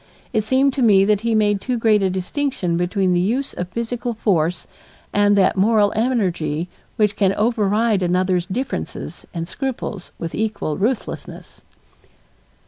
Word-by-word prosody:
It 220 -2 +2
seemed 265 +5 +2
to 270 - -2
me 200 -5 +5
that 210 -1 +2
he 230 -1 0
made 205 -2 +2
too 250 -2 -1
great 220 -2 +3
a 190 - +2
distinction 185 - -2
between 180 +2 +1
the 175 - +2
use 240 +10 -1
of 175 - -4
physical 235 +3 -3
force 180 -6 0 0.5
and 205 0 +4
that 190 -2 +3
moral 205 +1 +3
energy 180 - 0 0.3
which 210 -3 +2
can 195 -1 +2
override 215 -1 +1
another's 180 0 +1
differences 250 +8 -5
and 165 -1 -4
scruples 245 -7 -5
with 165 - -5
equal 210 -8 -2
ruthlessness. 225 +4 -4
205 Hz, 145 wpm, -21 LUFS, 185-230 Hz, 0.5 s, me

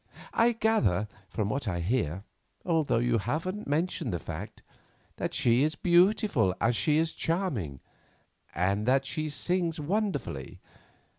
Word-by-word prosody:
I 235 +1 +4
gather 120 - +2 0.2
from 105 -1 -2
what 135 0 -2
I 85 -3 -1
hear—although 115 - -1
you 120 0 +2
haven't 165 - -3
mentioned 155 - 0
the 85 - -1
fact—that 85 +6 -8
she 120 +1 +3
is 155 +2 +2
as - - -16
beautiful 175 - +3
as 115 +2 +2
she 150 +5 +2
is 160 0 +1
charming, 130 - -2 0.7
and 100 +6 0
that 135 +1 +3
she 155 +2 -2
sings 170 +2 -1
wonderfully. 200 +7 -2
140 Hz, 130 wpm, -29 LUFS, 105-175 Hz, 0.7 s, I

